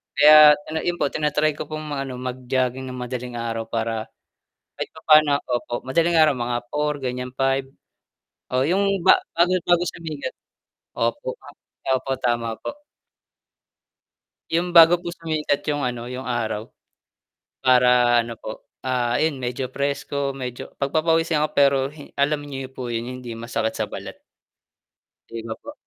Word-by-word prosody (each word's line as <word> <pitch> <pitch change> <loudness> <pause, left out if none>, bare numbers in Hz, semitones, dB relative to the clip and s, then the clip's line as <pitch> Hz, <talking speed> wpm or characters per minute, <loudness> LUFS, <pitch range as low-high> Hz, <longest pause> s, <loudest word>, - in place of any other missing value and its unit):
Kaya 150 0 +9 0.3
'yun 175 - 0
po - - +2
tina-try 150 0 +1
ko - - -5
pong 155 -1 -6
mag-ano 135 -2 -3
mag-jogging 130 0 -2
nang 125 - -7
madaling 125 0 -5
araw 115 -1 -3
para 115 -1 -2 0.7
kahit - - -4
pa-paano 155 -2 +5
opo, 120 -1 -3
madaling 165 +6 +1
nga 155 -1 +6
mga 120 -2 -2
4 150 0 0
gan'yan 125 0 -4
5, 135 0 +1 0.9
oo 130 0 +2
'yung 195 +3 +2
ba-bago, 180 -1 +4
bago 175 0 +4
sumikat 160 -4 -6 0.6
opo 115 +2 -1 0.6
opo 130 +1 -1
tama 120 -2 -1
po. - - -5 1.8
'Yung 175 +1 0
bago 170 +1 +8
po 175 0 -6
sumikat 155 -4 -1
'yung 145 -1 -1
ano, 120 -1 -4
'yung 130 +1 -6
araw 110 -3 -2 1.0
para 125 -2 +5
ano 115 0 -6
po, 110 - -8 0.2
ah, 125 -2 +1
ayun 155 -3 +1
medyo 125 +1 -3
fresko 140 0 -2
medyo 125 -2 -6
pag-pa-pawisan 160 +2 +2
ako 155 - 0
pero 140 -1 +4
hi 150 -1 -12
alam 145 +1 +1
niyo 135 -2 -6
po 130 -2 -6
'yun, 115 0 -2 0.2
hindi 120 -2 -7
masakit 115 -1 -2
sa - - 0
balat. - - -8 1.1
'Di 115 0 -6
ba 110 - -4
po? 290 - -8
135 Hz, 140 wpm, -23 LUFS, 125-155 Hz, 1.8 s, Kaya